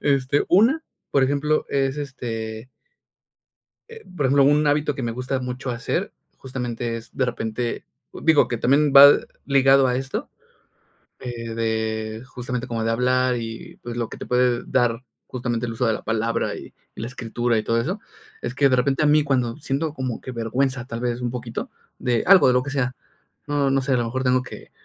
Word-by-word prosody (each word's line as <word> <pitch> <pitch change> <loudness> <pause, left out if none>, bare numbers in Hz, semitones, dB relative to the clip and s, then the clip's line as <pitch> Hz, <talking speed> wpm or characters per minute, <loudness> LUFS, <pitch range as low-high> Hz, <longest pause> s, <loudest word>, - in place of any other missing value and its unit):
Este, 140 0 +1
una, 235 - +4 0.3
por 140 - +3
ejemplo, 145 +3 0
es 135 0 0
este 115 -4 -5 1.2
Eh, 455 -1 -11
por 145 - 0
ejemplo, 140 +1 +4
un 145 +2 +4
hábito 145 0 +1
que 130 - -4
me 115 - -1
gusta 130 +2 -2
mucho 125 +1 -5
hacer, 120 -1 -2 0.3
justamente 120 -3 -4
es 115 - -13
de 130 - +1
repente, 115 0 -3 0.3
digo, 160 -2 +3
que 120 - -2
también 140 +4 +3
va 140 +1 +12 0.4
ligado 135 -1 +5
a 125 - +1
esto, 135 +1 -4 0.9
eh, 115 -2 -6
de 110 0 -2
justamente 125 0 -5
como 115 -2 -2
de 115 - +1
hablar 125 +1 +2
y, 115 -1 -7
pues, 120 0 -6
lo 115 -2 -1
que - - -9
te - - -7
puede 125 -1 +2
dar 120 +1 +1 0.2
justamente 120 -2 -3
el 115 - -4
uso 125 +2 -1
de 110 - +2
la - - -5
palabra 115 +1 -1
y - - -10 0.2
y - - -7
la 115 - -3
escritura 120 -1 -1
y 110 - -1
todo 115 0 +1
eso, 180 - -2 0.4
es - - -4
que 140 - +4
de 130 - +3
repente 135 +4 +1
a - - +3
mí 150 0 +4
cuando 125 -4 0
siento 145 +1 -2
como 130 -5 -4
que 130 - -8
vergüenza 125 +2 -1
tal 115 -2 -6
vez, 120 0 -2
un 120 -1 -2
poquito 120 -2 -5 0.3
de 120 -2 0
algo, 190 -8 +7
de 125 - +4
lo 125 0 +2
que 145 - -5
sea, 130 -3 -1 0.5
no 145 -2 +1
no 135 0 +2
sé, 135 0 -1
a - - +3
lo 120 - 0
mejor 130 +3 -3
tengo 130 0 +2
que, 125 - -11
125 Hz, 200 wpm, -23 LUFS, 115-140 Hz, 1.2 s, va